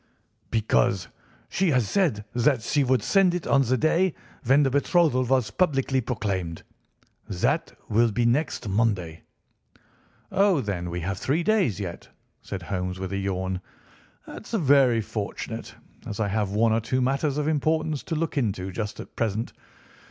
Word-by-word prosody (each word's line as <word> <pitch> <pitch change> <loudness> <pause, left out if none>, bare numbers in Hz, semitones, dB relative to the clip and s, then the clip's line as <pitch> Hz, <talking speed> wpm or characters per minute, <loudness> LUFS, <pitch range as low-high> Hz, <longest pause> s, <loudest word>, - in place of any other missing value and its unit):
"Because 105 -4 +1 0.4
she 190 -1 +1
has 125 -7 +2
said 145 - +1
that 120 0 +2
she 145 - +1
would 130 -1 +2
send 190 -3 +3
it 180 - -3
on 140 - +4
the 130 0 +1
day 165 +5 +2 0.3
when 135 +4 +4
the 135 - +1
betrothal 145 -1 +3
was 130 -2 +1
publicly 135 -6 +1
proclaimed. 95 -9 -3 0.7
That 90 - -1
will 115 +2 +3
be 120 +3 0
next 125 0 0
Monday." 95 -6 0 1.1
"Oh, 195 -5 +3
then 95 -7 -3
we 90 +1 -4
have 95 +2 -3
three 155 +6 0
days 185 - +2
yet," 90 -4 -6 0.3
said 95 -3 -6
Holmes 90 0 -3
with 95 +1 -5
a - - -1
yawn. 95 -1 -2 0.6
"That - - -10
is 225 - -1
very 135 -6 +4
fortunate, 105 -1 -5 0.3
as 105 - -5
I 105 -2 0
have 105 0 0
one 110 +3 +2
or 115 - +1
two 130 +3 -1
matters 135 +3 0
of 150 0 0
importance 155 0 0
to 165 - -2
look 155 -2 -1
into 95 -6 -2
just 105 +2 -4
at - - -10
present. 110 0 -2
120 Hz, 160 wpm, -25 LUFS, 100-145 Hz, 1.1 s, on